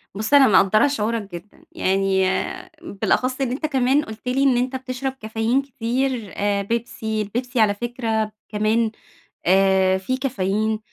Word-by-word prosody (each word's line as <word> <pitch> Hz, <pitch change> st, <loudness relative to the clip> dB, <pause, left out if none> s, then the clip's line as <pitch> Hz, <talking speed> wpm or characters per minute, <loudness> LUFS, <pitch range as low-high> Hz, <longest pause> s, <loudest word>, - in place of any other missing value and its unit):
بُصّ، 215 Hz, +6 st, -3 dB
أنا 280 Hz, -2 st, +8 dB
مقدَّرة 215 Hz, +5 st, +4 dB
شعورك 225 Hz, -6 st, -2 dB
جدًا، 190 Hz, +4 st, -12 dB
يعني 190 Hz, 0 st, +1 dB, 0.6 s
بالأخَصّ 255 Hz, +6 st, -1 dB
إن 260 Hz, -3 st, 0 dB
أنت 275 Hz, +5 st, -3 dB
كمان 270 Hz, 0 st, +2 dB
قلت 220 Hz, +1 st, -10 dB
لي 260 Hz, +2 st, +1 dB
إن 265 Hz, -3 st, +4 dB
أنت 255 Hz, +2 st, -1 dB
بتشرب 260 Hz, 0 st, -3 dB
كافيين 225 Hz, +1 st, -1 dB
كتير 250 Hz, -3 st, -2 dB
آآ، 200 Hz, 0 st, 0 dB
بيبسي، 220 Hz, 0 st, -3 dB
البيبسي 245 Hz, +4 st, -3 dB
على 210 Hz, -2 st, +4 dB
فكرة 225 Hz, -1 st, -2 dB, 0.2 s
كمان 215 Hz, +2 st, +1 dB, 0.5 s
آآ، 190 Hz, 0 st, +4 dB
في 255 Hz, +8 st, -2 dB
كافيين 220 Hz, -4 st, -1 dB
225 Hz, 145 wpm, -22 LUFS, 205-255 Hz, 0.6 s, أنا